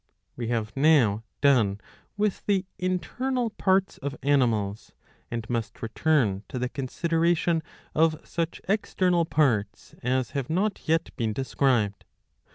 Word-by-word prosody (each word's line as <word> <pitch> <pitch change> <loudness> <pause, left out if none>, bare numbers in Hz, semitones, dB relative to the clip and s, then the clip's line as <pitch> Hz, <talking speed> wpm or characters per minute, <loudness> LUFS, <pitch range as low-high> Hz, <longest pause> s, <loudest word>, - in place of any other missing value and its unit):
We 120 -2 -4
have 110 -2 -2
now 135 -8 +4 0.2
done 115 -8 +4 0.4
with 210 -1 0
the 195 -2 +2
internal 235 +7 -1
parts 190 -1 +1
of 140 0 -4
animals, 115 -8 +1 0.4
and 115 -1 -4
must 115 -2 -3
return 115 -4 +1
to - - -5
the 125 0 -1
consideration 165 +4 +1 0.3
of 160 0 +3
such 170 0 -3
external 180 -4 +1
parts 110 -11 0
as 125 0 0
have 135 -3 -3
not 195 +5 -1
yet 165 +1 +1
been 110 -3 0
described. 125 -4 0
140 Hz, 125 wpm, -26 LUFS, 115-170 Hz, 0.4 s, now